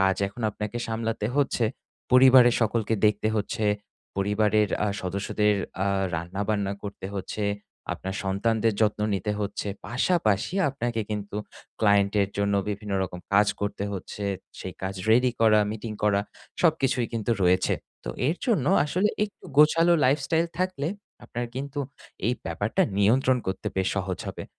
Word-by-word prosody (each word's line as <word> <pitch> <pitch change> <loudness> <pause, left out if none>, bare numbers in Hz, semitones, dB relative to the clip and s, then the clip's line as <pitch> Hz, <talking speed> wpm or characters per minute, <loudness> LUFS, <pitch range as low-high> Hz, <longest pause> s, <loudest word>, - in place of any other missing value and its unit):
কাজ 95 0 +3
এখন 115 +4 -9
আপনাকে 105 +3 -4
সামলাতে 115 -1 -2
হচ্ছে 140 -4 +2 0.5
পরিবারের 130 -1 +8
সকলকে 110 0 +1
দেখতে 105 +1 +1
হচ্ছে 110 +2 -2 0.5
পরিবারের 105 +1 +2 0.2
আ - - +1
সদস্যদের 100 +3 0 0.3
আ - - 0 0.3
রান্না 85 +4 -3
বান্না 100 -2 0
করতে 100 -2 -6
হচ্ছে, 100 +2 -3 0.5
আপনার 95 +1 -5
সন্তানদের 110 +3 +1
যত্ন 105 -1 +2
নিতে 100 +2 -1
হচ্ছে, 105 0 -3 0.2
পাশাপাশি 125 - +1
আপনাকে 120 -4 -2
কিন্তু 105 -1 -4 0.4
ক্লায়েন্ট 100 -2 +4
এর 100 - -2
জন্য 100 0 +1
বিভিন্ন 105 0 -4
রকম 90 -1 -5
কাজ 100 +1 +5
করতে 100 0 -2
হচ্ছে। 100 +1 -6 0.3
সেই 95 - -6
কাজ 95 +1 -2 0.2
ready 125 +3 +5
করা 110 -1 +6
meeting 110 0 -5
করা 100 -1 +3 0.4
সবকিছুই 135 -7 +2
কিন্তু 115 0 -2
রয়েছে। 90 +1 +3 0.3
তো - - -3 0.2
এর 165 - 0
জন্য 200 - +2 0.2
আসলে 180 +7 +1 0.2
একটু 205 - -12
গোছালো 165 +3 +6
lifestyle 150 +5 +2
থাকলে 185 -6 -1 0.4
আপনার 120 0 -4
কিন্তু 140 +2 -5 0.5
এই 120 - +3
ব্যাপারটা 100 +2 0 0.2
নিয়ন্ত্রণ 125 +5 +4
করতে 95 0 -3
বেশ 95 0 +1
সহজ 95 -2 -2
হবে - - -6
110 Hz, 145 wpm, -26 LUFS, 100-125 Hz, 0.5 s, পরিবারের